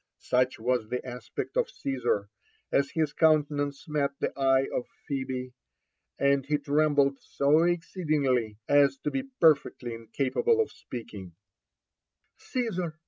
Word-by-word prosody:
Such 125 Hz, 0 st, +1 dB
was 120 Hz, -1 st, -1 dB
the 125 Hz, 0 st, -3 dB
aspect 125 Hz, -, -6 dB
of -, -, +1 dB
Caesar 120 Hz, -7 st, -1 dB, 0.4 s
as 140 Hz, 0 st, +2 dB
his 155 Hz, -3 st, -1 dB
countenance 145 Hz, -3 st, +1 dB
met 150 Hz, -2 st, +1 dB
the -, -, -1 dB
eye 135 Hz, -1 st, +3 dB
o{ -, -, 0 dB, 0.3 s
Phebe, 130 Hz, -2 st, -3 dB, 0.6 s
and 140 Hz, 0 st, +3 dB
be 150 Hz, +3 st, 0 dB
trembled 145 Hz, -1 st, +2 dB
so 145 Hz, +3 st, +2 dB
exceedingly 150 Hz, -, 0 dB
as 140 Hz, -1 st, +4 dB
to 150 Hz, -, -1 dB
be 270 Hz, -, -1 dB, 0.2 s
perfectly 140 Hz, -6 st, +3 dB
incapable 130 Hz, -, 0 dB
of 445 Hz, -, +1 dB
speaking, 100 Hz, -7 st, -9 dB, 0.5 s
*' -, -, -52 dB
Caesar 185 Hz, -10 st, -2 dB
140 Hz, 130 wpm, -28 LUFS, 125-155 Hz, 0.6 s, as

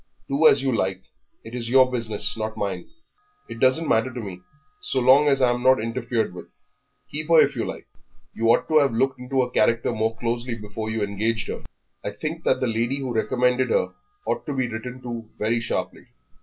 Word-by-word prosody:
"Do 145 Hz, +3 st, +4 dB
as 135 Hz, -, +4 dB
you 130 Hz, -3 st, +1 dB
like; 95 Hz, -2 st, -1 dB, 0.4 s
it 115 Hz, -, -11 dB
is 120 Hz, -2 st, -4 dB
your 130 Hz, 0 st, +5 dB
business, 110 Hz, -4 st, -1 dB
not 110 Hz, 0 st, -4 dB
mine. 95 Hz, -4 st, -4 dB, 0.6 s
It 115 Hz, 0 st, -8 dB
doesn't 130 Hz, +6 st, +5 dB
matter 115 Hz, +3 st, +2 dB
to 125 Hz, -, -6 dB
me, 95 Hz, -5 st, -7 dB, 0.4 s
so 130 Hz, -, -1 dB
long 130 Hz, +4 st, +5 dB
as 135 Hz, -2 st, +3 dB
I'm 120 Hz, -1 st, +2 dB
not 130 Hz, 0 st, +5 dB
interfered 115 Hz, -1 st, -2 dB
with; 90 Hz, -, -10 dB, 0.6 s
keep 155 Hz, +1 st, -3 dB
her 165 Hz, -1 st, +6 dB
if -, -, +4 dB
you -, -, -2 dB
like. -, -, -7 dB, 0.5 s
You 115 Hz, -, -1 dB
ought 120 Hz, -, +3 dB
to 155 Hz, -1 st, +5 dB
have 140 Hz, -4 st, +2 dB
looked 130 Hz, +2 st, 0 dB
into 130 Hz, +1 st, 0 dB
her 125 Hz, -, -5 dB
character 115 Hz, 0 st, +2 dB
more 110 Hz, +1 st, -1 dB
closely 120 Hz, +1 st, -2 dB
before 110 Hz, 0 st, -6 dB
you 110 Hz, -1 st, -1 dB
engaged 110 Hz, +3 st, -1 dB
her. -, -, -4 dB, 0.4 s
I -, -, -2 dB
think 160 Hz, +2 st, -5 dB
that 130 Hz, -, +2 dB
the -, -, +2 dB
lady 120 Hz, +3 st, 0 dB
who 130 Hz, -3 st, -4 dB
recommended 125 Hz, +3 st, +1 dB
her -, -, +1 dB, 0.3 s
ought -, -, -2 dB
to 145 Hz, -, -2 dB
be 130 Hz, -2 st, 0 dB
written 125 Hz, +3 st, -7 dB
to 115 Hz, -2 st, -6 dB
very 115 Hz, +2 st, 0 dB
sharply." 115 Hz, -, -4 dB
120 Hz, 205 wpm, -24 LUFS, 110-130 Hz, 0.6 s, her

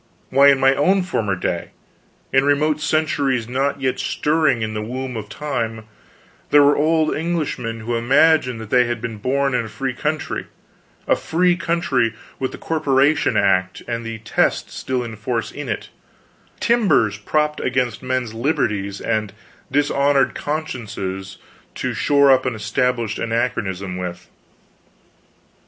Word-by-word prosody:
Why, 140 Hz, +2 st, +6 dB
in 140 Hz, -1 st, +5 dB
my 135 Hz, 0 st, +5 dB
own 185 Hz, +8 st, +2 dB
former 110 Hz, -, -1 dB
day 90 Hz, -1 st, -3 dB, 0.6 s
in 135 Hz, 0 st, +5 dB
remote 150 Hz, +2 st, +2 dB
centuries 145 Hz, -7 st, 0 dB
not 135 Hz, +3 st, -1 dB
yet 130 Hz, -1 st, -1 dB
stirring 150 Hz, -6 st, +1 dB
in 110 Hz, 0 st, -3 dB
the 105 Hz, -, -3 dB
womb 125 Hz, +3 st, -5 dB
of 105 Hz, -2 st, -6 dB
time 115 Hz, -6 st, -3 dB, 0.7 s
there 145 Hz, 0 st, +6 dB
were 145 Hz, +1 st, +5 dB
old 155 Hz, +1 st, +2 dB
Englishmen 150 Hz, -9 st, -2 dB
who 120 Hz, +2 st, -2 dB
imagined 130 Hz, +1 st, +3 dB
that 110 Hz, -2 st, -9 dB
they 125 Hz, -1 st, +5 dB
had 120 Hz, -1 st, -2 dB
been 115 Hz, -1 st, -5 dB
born 135 Hz, +5 st, 0 dB
in 120 Hz, -2 st, 0 dB
a -, -, -8 dB
free 130 Hz, +3 st, -3 dB
country: 150 Hz, +4 st, -3 dB, 0.6 s
a -, -, +4 dB
"free" 175 Hz, +2 st, +1 dB
country 160 Hz, -10 st, 0 dB, 0.2 s
with 130 Hz, -, -2 dB
the -, -, -8 dB
Corporation 145 Hz, -5 st, +2 dB
Act 95 Hz, -2 st, +1 dB
and 115 Hz, -1 st, -3 dB
the 115 Hz, 0 st, -5 dB
Test 110 Hz, -, 0 dB
still 130 Hz, -1 st, -2 dB
in 115 Hz, -2 st, -7 dB
force 115 Hz, +2 st, -3 dB
in -, -, -7 dB
it -, -, -4 dB, 0.7 s
timbers 195 Hz, -, +2 dB
propped 150 Hz, +7 st, 0 dB
against 125 Hz, -3 st, -1 dB
men's 130 Hz, -3 st, -2 dB
liberties 105 Hz, -6 st, -1 dB
and 110 Hz, -3 st, -1 dB, 0.4 s
dishonored 140 Hz, 0 st, +2 dB
consciences 110 Hz, -11 st, -4 dB, 0.4 s
to -, -, -2 dB
shore 140 Hz, -1 st, +4 dB
up 130 Hz, 0 st, +3 dB
an 125 Hz, -, -1 dB
Established 115 Hz, +1 st, -1 dB
Anachronism 100 Hz, -5 st, -2 dB
with. 90 Hz, -1 st, -6 dB
130 Hz, 145 wpm, -21 LUFS, 110-145 Hz, 0.7 s, Why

